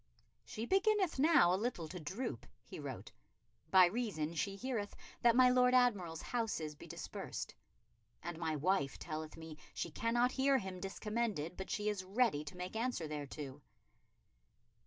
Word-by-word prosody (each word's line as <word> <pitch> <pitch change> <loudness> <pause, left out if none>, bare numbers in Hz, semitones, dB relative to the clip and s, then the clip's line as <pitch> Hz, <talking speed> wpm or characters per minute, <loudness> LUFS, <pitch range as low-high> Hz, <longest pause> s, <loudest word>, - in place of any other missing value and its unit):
"She 225 0 -5
beginneth 385 - +2
now 270 - +6
a 190 - 0
little 215 -9 -2
to 180 +3 -7
droop," 190 - -4 0.2
he - - -9
wrote, - - -6 0.6
"by 185 -1 +8
reason 175 -6 -1
she 195 +5 -1
heareth 215 -2 -3 0.3
that 235 -1 +5
my 255 0 +7
Lord 250 0 +5
Admiral's 200 -10 +2
houses 215 -11 -2
be 145 - -12
dispersed. - - -5 0.7
And 170 0 -5
my 160 -2 -1
wife 150 -2 +1
telleth 155 -1 -5
me 160 -1 -9 0.2
she 170 - -3
cannot 240 +7 +2
hear 270 +1 +3
him 190 -5 -5
discommended, 200 -4 -2
but 190 - -6
she 210 -1 -1
is 205 -3 -1
ready 195 -5 +2
to 150 - -8
make 180 +3 -5
answer 230 -8 -1
thereto." 145 -1 -6
195 Hz, 155 wpm, -36 LUFS, 160-240 Hz, 0.7 s, by